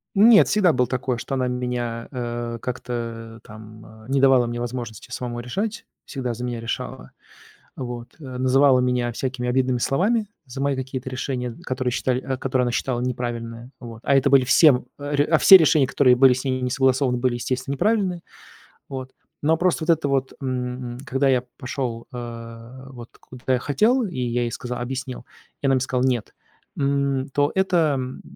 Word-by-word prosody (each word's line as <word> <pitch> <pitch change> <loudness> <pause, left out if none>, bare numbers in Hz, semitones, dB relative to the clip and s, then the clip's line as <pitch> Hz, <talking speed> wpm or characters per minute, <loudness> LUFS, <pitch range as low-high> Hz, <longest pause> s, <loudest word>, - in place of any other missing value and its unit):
Нет, 215 +2 +7
всегда 190 -5 +3
было 125 -1 +2
такое, 125 0 -2
что 130 +3 -5
она 130 -1 0
меня, 125 -2 -3
э, 120 -2 -4
как-то, 115 -2 -5
э, - - -22
там, 110 0 -12
а, 110 0 -15
не 135 0 +1
давала 130 -3 +5
мне 120 0 -4
возможности 120 -2 -6
самому 120 -1 -4
решать. 205 - -4 0.2
Всегда 125 -3 -4
за 125 - -6
меня 120 -2 -3
решала. 115 - -5 0.7
Вот, 120 -2 -7
э, 155 - -12
называла 130 0 +4
меня 125 -1 0
всякими 125 0 -3
обидными 130 0 +1
словами 205 - +1 0.2
за 130 +1 -9
мои 140 -1 +1
какие-то 130 0 -5
решения, 125 -2 -4
которые 130 -1 -2
считали 125 0 0
а, 130 -1 -3
которые 130 -1 0
она 120 - 0
считала 120 0 -1
неправильные. 120 -1 -4
Вот, 115 -2 -10
а 140 - +3
это 140 +1 +4
были 135 -1 +6
всем 130 -1 +5
э, - - -9
а 145 0 -2
ре 145 - +3
а, 160 0 +3
все 195 - +9
решения, 155 -5 +3
которые 130 -3 +4
были 130 -1 +7
с 130 - -4
ней 130 -1 -1
не 125 - -1
согласованы, 130 -1 +2
были, 125 0 0
естественно, 130 +3 -3
неправильные. 190 0 0 0.7
Вот, 130 -1 -7 0.3
но 155 +2 +3
а 160 - +2
просто 175 -2 +1
вот 170 - -8
это 145 -2 -3
вот, 135 -1 0
м, 125 -2 -3
м, - - -9
когда 135 +1 +1
я 130 -2 +3 0.2
пошел, 125 -3 -4
а, 120 +1 -9
вот 120 -2 -11
куда 130 +1 -4
я 125 - +2
хотел, 220 - +2
и 180 - -4
я 120 -1 -1
ей 120 - -2
сказа 125 +2 -5
объяснил, 130 0 -5 0.4
и - - -4
она 135 - +4
мне 130 - +2
сказала: 130 0 0
"Нет", 120 -4 -1 0.5
м, 140 -1 0
то 145 0 +2
это, 175 -6 +2
м, 130 0 -5
130 Hz, 195 wpm, -23 LUFS, 120-135 Hz, 0.7 s, все